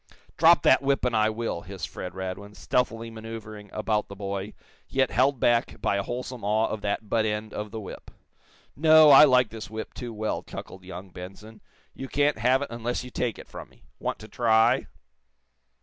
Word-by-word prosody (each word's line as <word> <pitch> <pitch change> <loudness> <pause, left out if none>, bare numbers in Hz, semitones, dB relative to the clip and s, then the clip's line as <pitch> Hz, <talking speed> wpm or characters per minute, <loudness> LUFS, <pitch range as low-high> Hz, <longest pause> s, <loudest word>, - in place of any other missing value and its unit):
"Drop 165 -1 +5
that 130 - +5
whip, 140 -1 +1
and 125 -2 0
I 110 0 +3
will!" 110 -6 -3
hissed 95 0 -6
Fred 90 0 -7
Radwin, 95 +2 -6
stealthily 115 +3 -1
manoeuvering 110 -2 -9
about 110 0 -1
the 100 - -9
boy, 100 0 -5 0.4
yet 130 -1 +1
held 130 +2 +2
back 120 0 +1
by 100 - 0
a - - 0
wholesome 125 +2 -6
awe 110 +2 +2
of 110 - -4
that 105 +1 -2
butt 110 +1 +1
end 105 0 -3
of 105 0 -5
the 110 +1 -6
whip. 100 - -9 0.7
"No; 155 0 +7
I 140 +2 +10
like 125 -4 +4
this 110 -4 -8
whip 110 +1 -7
too 120 -2 -6
well," 110 0 -3
chuckled 95 - -10
young 95 0 -9
Benson. 100 +5 -11 0.3
"You 135 - -7
can't 145 -2 +1
have 130 +4 +3
it - - -6
unless 120 +1 -3
you 125 - -10
take 120 -4 -2
it - - -11
from - - -10
me. 65 -2 -25 0.2
Want - - -3
to 110 - -12
try?" 115 +1 +3
110 Hz, 195 wpm, -26 LUFS, 105-125 Hz, 0.7 s, I